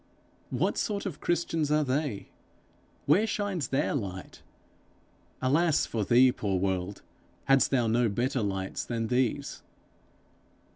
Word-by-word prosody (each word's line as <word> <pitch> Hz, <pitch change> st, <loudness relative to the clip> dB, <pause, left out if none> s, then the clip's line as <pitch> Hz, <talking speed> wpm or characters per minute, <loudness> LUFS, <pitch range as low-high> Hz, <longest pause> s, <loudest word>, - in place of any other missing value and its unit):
What -, -, 0 dB
sort 205 Hz, -2 st, -2 dB
of 180 Hz, -7 st, -5 dB
Christians 165 Hz, -3 st, 0 dB
are 150 Hz, 0 st, +3 dB
they? 135 Hz, -5 st, -2 dB, 0.8 s
Where 190 Hz, +10 st, +4 dB
shines 200 Hz, -, -2 dB
their 135 Hz, -, 0 dB
light? 95 Hz, -, -5 dB, 1.0 s
Alas 155 Hz, +4 st, +3 dB
for 110 Hz, -2 st, -2 dB
thee, 125 Hz, +4 st, +5 dB
poor 100 Hz, -5 st, -2 dB
world, 95 Hz, +1 st, -2 dB, 0.4 s
hadst 135 Hz, -1 st, +4 dB
thou 125 Hz, -3 st, +2 dB
no 115 Hz, +1 st, +2 dB
better 120 Hz, +5 st, -1 dB
lights 95 Hz, -2 st, -3 dB
than 115 Hz, -2 st, -3 dB
these! 125 Hz, -1 st, -1 dB
130 Hz, 125 wpm, -28 LUFS, 105-150 Hz, 1.0 s, thee